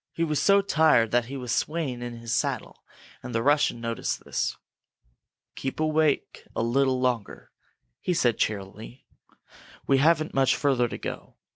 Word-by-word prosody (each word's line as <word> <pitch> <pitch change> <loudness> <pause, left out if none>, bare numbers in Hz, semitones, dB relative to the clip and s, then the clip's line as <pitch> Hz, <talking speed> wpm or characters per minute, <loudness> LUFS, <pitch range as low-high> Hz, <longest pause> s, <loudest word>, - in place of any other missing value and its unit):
He 165 - -1
was 150 -3 0
so 200 0 +4
tired 155 - +3
that 120 -1 +2
he 135 +3 -6
was 125 -3 -5
swaying 150 -4 -1
in 120 -1 -5
his 115 0 -4
saddle, - - -2 0.4
and 125 -2 -7
the 115 - +1
Russian 145 -4 +2
noticed 115 0 -3
this. - - -2 1.0
"Keep 135 +2 -5
awake 155 -1 0
a - - 0
little 130 +2 +2
longer," 125 -5 -2 0.5
he 180 - -1
said, 120 -7 +1
cheerily. 105 +4 -4 0.8
"We 135 -1 +3
haven't 155 +1 +3
very - - +1
much 135 0 +3
further 135 -4 +1
to - - -6
go. - - -7
130 Hz, 160 wpm, -26 LUFS, 120-155 Hz, 1.0 s, so